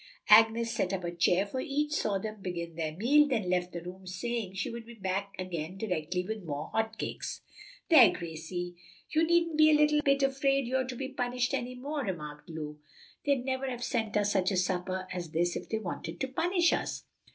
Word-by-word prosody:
Agnes 225 +2 +6
set 185 - 0
up 185 -1 -2
a 170 - -2
chair 175 +3 +3
for 230 +6 -4
each, 295 +3 -1
saw 205 -8 +1
them 215 +1 -6
begin 170 -2 -4
their 160 -1 -2
meal, 290 +8 +5
then 225 -9 0
left 180 0 0
the 170 -1 -6
room, 185 +1 -9
saying 225 +2 -3
she 195 - -2
would 235 0 -6
be 235 +1 -12
back 195 0 -2
again 180 -1 -4
directly 180 -3 -2
with 220 0 -3
more 150 -3 -5
hot 220 0 -1
cakes. - - -4 0.5
"There, 255 - +8
Gracie, 170 +2 -5 0.3
you 315 +1 +3
needn't 335 -1 +2
be 310 -1 +7
the 300 - +6
least 300 0 +2
bit 275 0 +3
afraid 275 0 +2
you're 260 +1 0
to 255 - -5
be 265 +2 -4
punished 250 -1 -1
any 250 +1 -2
more," 285 +3 -3
remarked 150 -7 -6
Lulu. 150 -2 -6 0.5
"They'd 275 -3 +2
never 265 0 -1
have 245 -1 -5
sent 225 -4 -1
us 205 0 +2
such 185 -2 +2
a 195 - 0
supper 185 +1 -1
as 175 -3 -5
this 175 +2 +1
if - - -6
they 220 - 0
wanted 195 -6 -5
to 265 - +1
punish 345 +5 +2
us." - - -2
215 Hz, 210 wpm, -30 LUFS, 180-260 Hz, 0.5 s, There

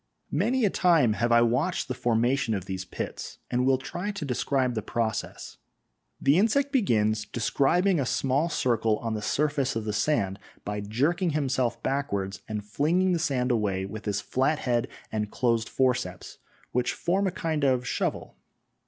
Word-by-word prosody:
Many 230 - +2
a 200 - +2
time 165 - +4
have 120 +3 0
I 120 0 +6
watched 130 +10 0
the 130 - -2
formation 120 0 +1
of 95 -2 -4
these 95 -1 -4
pits, - - -6
and 125 +1 +1
will 135 -1 +4
try 175 +9 -5
to 200 -7 -4
describe 130 0 0
the 110 - -2
process. 110 +1 -3 0.6
The 140 +6 +4
insect 275 +7 +2
begins 110 - +2
describing 170 - +2
a 135 - 0
small 140 +6 +1
circle 115 -7 +1
on 115 -1 -3
the 105 - -3
surface 140 +1 0
of 115 -1 -2
the 105 - -2
sand 100 -4 0 0.3
by 105 0 -3
jerking 150 - 0
himself 130 -4 -1
backwards 100 -9 -2
and 105 -1 -4
flinging 165 - +1
the 175 - +1
sand 135 -5 0
away 100 -5 0
with 105 +2 -8
his 105 -1 -1
flat 135 +4 +1
head 120 -4 0 0.2
and 105 -1 -2
closed 115 -2 0
forceps, 125 -9 -1 0.3
which 125 0 0
form 190 +3 0
a - - 0
kind 160 -4 -2
of 130 -2 +2
shovel. - - -2
125 Hz, 170 wpm, -27 LUFS, 110-150 Hz, 0.6 s, I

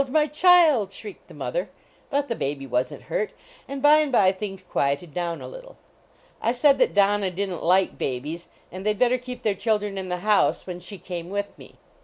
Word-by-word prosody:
my 300 +2 +3
child!" 305 - +5
shrieked 205 0 -10
the - - -14
mother. - - -3 0.4
But 285 0 0
the 235 - -2
baby 135 -4 -3
wasn 125 0 -1
t - - -19
hurt, 475 -4 -2 0.3
and 275 0 -6
by 300 +1 +7
and 300 -2 0
by 195 -6 +5
things 195 -1 -7
juieted 140 -1 -1
down 170 -1 -3
a - - -7
little. - - -12 0.3
I 235 - -5
said 275 +2 +4
that - - +2
Donna 200 -1 +3
didn 190 +2 -3
t - - -9
like 185 +2 +2
babies.. 145 +7 -4 0.2
n 185 - -7
d - - -10
they 215 - +3
d - - -12
bet 245 +1 +3
ter 255 - +3
keep 250 0 -9
their 215 - +2
children 205 -1 -1
in 185 -1 -6
the 180 0 -3
house 210 -1 +2
when 180 -1 -6
^hr 185 +2 -9
came 175 -1 -6
with 205 +1 -4
me. - - -15
205 Hz, 225 wpm, -24 LUFS, 180-265 Hz, 0.4 s, by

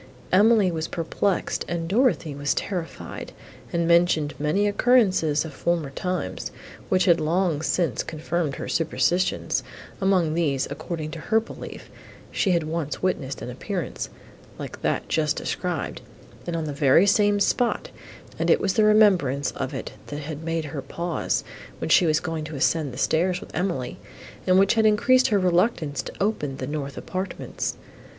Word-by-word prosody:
Emily 205 0 +5
was 160 -1 -2
perplexed, 180 +3 -1
and 170 -1 -2
Dorothée 200 - +2
was 145 0 0
terrified, 180 -4 -5 0.4
and 170 -1 0
mentioned 170 -3 +3
many 155 +8 +2
occurrences 200 -9 +3
of 155 - -7
former 165 -2 -1
times, 170 - -3 0.4
which 185 0 +3
had 170 -3 +5
long 165 -1 +1
since 160 -3 0
confirmed 160 -2 -2
her - - -6
superstitions; 175 +2 +1 0.4
among 185 -5 +2
these, 145 -5 0
according 155 +1 -5
to 165 - -6
her 220 +7 +2
belief, 225 - -9 0.4
she 195 - +1
had 170 -3 +2
once 155 0 -3
witnessed 140 -7 -1
an 125 - -5
appearance, 175 - -4 0.5
like - - -7
that - - -1
just 155 -2 +1
described, 175 -5 -3 0.5
and 170 - -2
on 165 - -1
the 150 -2 -3
very 140 +5 +5
same 205 0 +3
spot, 235 +4 +1 0.5
and - - 0
it - - +5
was 195 -1 +1
the 215 - +3
remembrance 180 -11 +4
of 130 -1 -4
it, - - -5 0.2
that 145 0 -5
had 150 +1 -6
made 165 -1 -2
her 145 -1 -5
pause, 170 +4 -2 0.3
when - - -4
she 175 - +6
was 155 0 +3
going 160 -2 -4
to 155 0 -7
ascend 145 +1 +1
the 125 - -9
stairs 175 +5 +1
with - - -12
Emily, 175 -9 -2 0.5
and 185 0 +5
which 195 0 +5
had 220 -1 +4
increased 255 +5 +4
her 210 - +2
reluctance 175 - +1
to - - -8
open 150 -10 -1
the 130 - -4
north 140 -1 -4
apartments. 185 +1 -4
170 Hz, 160 wpm, -25 LUFS, 150-190 Hz, 0.5 s, she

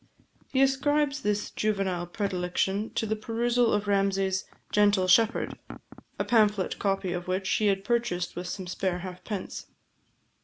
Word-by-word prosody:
He 265 0 +4
ascribes 280 +1 +1
this 210 -3 -1
juvenile 195 -4 -1
predilection 190 +2 -1
to - - 0
the 220 0 0
perusal 235 +2 +1
of 205 0 0
Ramsay's 195 -1 +1 0.3
"Gentle 205 -2 +3
Shepherd," 225 +4 +3 0.6
a - - -1
pamphlet 210 -5 +2
copy 195 -2 0
of 175 0 -5
which 190 +1 -1
he 210 +2 +2
had 195 -1 +1
purchased 230 -6 -1
with 175 +1 -5
some 185 +1 -5
spare 180 0 -2
halfpence. 185 +2 -6
200 Hz, 140 wpm, -28 LUFS, 185-225 Hz, 0.6 s, He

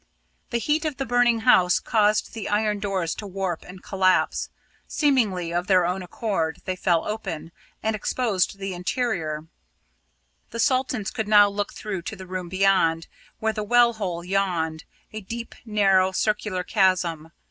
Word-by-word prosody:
The 235 - 0
heat 300 +7 0
of 305 -4 -2
the 270 - -2
burning 245 -1 +3
house 180 -4 +5
caused 215 -1 +1
the 225 -2 -5
iron 210 0 +1
doors 190 -5 -1
to 210 - -7
warp 190 -3 -3
and 180 +1 -12
collapse. 185 -1 +1 0.4
Seemingly 210 - +1
of 175 +2 -1
their 185 -3 +4
own 180 +2 -1
accord, 180 -3 -2
they 185 - -2
fell 175 -2 +1
open, 170 -7 -5 0.3
and 220 0 0
exposed 205 -3 0
the 195 -1 -4
interior. 175 -5 -2 1.0
The - - -7
Saltons 255 -5 +1
could 220 - -3
now 205 -1 +7
look 205 0 -4
through 195 -4 -4
to 215 - -6
the 190 -1 -10
room 185 -1 -5
beyond, 185 -4 +2 0.3
where 220 0 -1
the 215 - -3
well 240 +2 +4
hole 180 -6 -4
yawned, 175 -4 -1 0.3
a 215 - -5
deep 230 +4 -7
narrow 195 -4 +3
circular 210 -2 -1
chasm. 180 -5 +1
195 Hz, 160 wpm, -24 LUFS, 180-220 Hz, 1.0 s, now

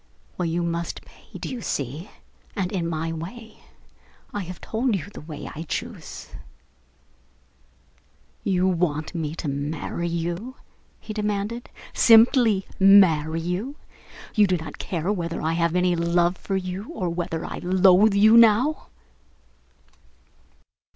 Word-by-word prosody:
Well, 180 - -2
you 170 +1 -1
must 170 0 -3
pay, - - -15
do - - -6
you 250 -2 -5
see, 145 - -4 0.5
and 185 -2 -2
in 175 -4 -2
my 165 0 -2
way? 210 +8 -9 0.7
I 205 - -2
have 180 0 -8
told 230 0 -1
you 180 - -4
the - - -9
way 150 -1 -8
I 155 - -7
choose." 165 - -6 2.1
"You 185 -2 +1
want 165 -4 -1
me 160 -2 -3
to 165 - -5
marry 145 +4 -3
you?" 170 +9 -3 0.4
he 215 - -7
demanded 210 +2 -3 0.2
"simply 225 -3 +5
marry 165 -5 +5
you? 185 - -3 0.6
You 210 -2 +4
do 185 -1 +1
not 160 -1 -9
care 180 +3 -2
whether 170 -3 -3
I 160 +1 -1
have 170 0 0
any 180 -1 +2
love 170 +1 +2
for 195 - -4
you 185 +3 -5
or 190 - -3
whether 170 -1 -3
I - - -6
loathe 190 +3 +4
you 215 +3 +6
now." 235 +6 +4
180 Hz, 135 wpm, -24 LUFS, 165-205 Hz, 2.1 s, you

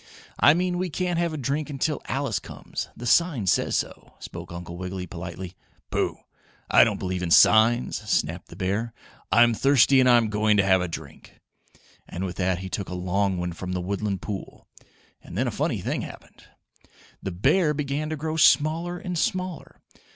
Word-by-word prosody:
"I 145 - +6
mean 180 0 0
we 185 0 -1
can't 175 +1 -1
have 170 -1 0
a 155 - -4
drink 145 +3 -2
until 145 +1 -2
Alice - - -1
comes - - -7
the 120 - -7
sign 145 - +3
says 90 - +2
so," - - -5
spoke - - -9
Uncle 85 0 -7
Wiggily, 90 +1 -5
politely. 85 +1 -7 0.4
"Pooh! - - -1 0.5
I - - +8
don't - - 0
believe 90 -1 -3
in 90 - -2
signs," 110 +7 +5
snapped 85 0 0
the - - -12
bear. 100 +5 -2 0.4
"I'm 120 0 +5
thirsty 135 +2 +4
and 130 -1 +5
I'm 120 -3 +5
going 105 0 +2
to 100 - +3
have 95 -1 +4
a 90 - -1
drink," 85 - -10 0.7
and 90 - -5
with 90 - -6
that 95 -1 +1
he 95 +1 -6
took 95 0 -4
a 90 - -5
long 95 +1 0
one 90 0 -3
from 90 +2 -5
the 90 - -1
woodland 100 +1 -3
pool. 100 -3 -7 0.6
And - - -9
then - - +1
a - - -1
funny - - -1
thing - - -2
happened. - - -11 0.8
The - - -4
bear 150 - +2
began 145 +1 -2
to 155 - -2
grow 155 +1 -3
smaller 160 +3 +3
and 180 -3 -4
smaller. 185 -1 -3
110 Hz, 185 wpm, -25 LUFS, 95-155 Hz, 0.8 s, I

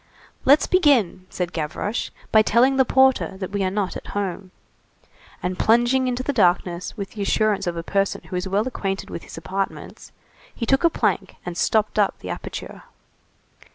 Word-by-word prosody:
"Let's 285 +3 +6
begin," 255 - +2
said 180 -2 -4
Gavroche, 165 +8 -3 0.2
"by 220 - +7
telling 250 +5 +3
the 265 - +5
porter 265 -6 +3
that 190 -1 -5
we 200 -1 -1
are 185 - +1
not 195 -1 -2
at - - -8
home." 195 -1 -3 0.9
And 180 0 -2
plunging 240 +3 +3
into 250 0 -1
the 285 - -1
darkness 180 -3 +1
with 200 -1 -5
the 210 - -7
assurance 210 0 +1
of 170 -1 -2
a 165 - -3
person 195 +2 -1
who 185 - -7
is 180 +1 -2
well 200 +5 0
acquainted 195 -6 -4
with - - -5
his - - -11
apartments, 190 +4 -5 0.4
he 230 - -3
took 270 +6 +2
a 335 - +6
plank - - -1
and 175 -1 -5
stopped 215 +4 +1
up 205 - +2
the - - -7
aperture. - - -7
200 Hz, 180 wpm, -23 LUFS, 185-245 Hz, 0.9 s, by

